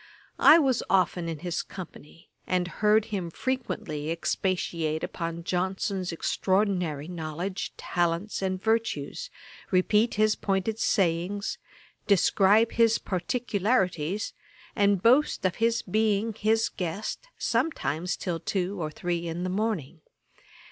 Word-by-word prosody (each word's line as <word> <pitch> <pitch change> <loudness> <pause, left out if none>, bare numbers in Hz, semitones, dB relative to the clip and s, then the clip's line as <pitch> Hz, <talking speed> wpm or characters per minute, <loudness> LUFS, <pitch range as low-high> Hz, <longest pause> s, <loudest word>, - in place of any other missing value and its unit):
I 315 - +9
was 270 -7 +2
often 180 -2 +2
in 165 - -4
his 175 -1 -1
company, 165 -3 -11 0.2
and 180 -1 +1
heard 210 +3 +2
him 180 -4 -2
frequently 165 - -3
expatiate 165 -2 -1
upon 170 -1 -4
Johnson's 185 +1 -1
extraordinary 180 -4 0
knowledge, 175 +2 -4
talents, 175 +4 -1
and 190 -1 -1
virtues, 225 - -1 0.4
repeat 210 +5 +3
his 215 0 +3
pointed 195 +3 -1
sayings, 185 +2 0 0.5
describe 200 +3 +4
his 230 -1 +4
particularities, 200 -3 -1 0.4
and 200 -2 +2
boast 255 -1 +4
of 185 - +1
his 230 0 +1
being 215 +2 +1
his 220 +1 +2
guest 195 - -4
sometimes 230 - -1
till 175 -3 -3
two 190 +1 -2
or 155 - -2
three 170 +1 -3
in 170 +2 -3
the 185 - -2
morning. 185 -7 -2
190 Hz, 115 wpm, -27 LUFS, 170-215 Hz, 0.5 s, I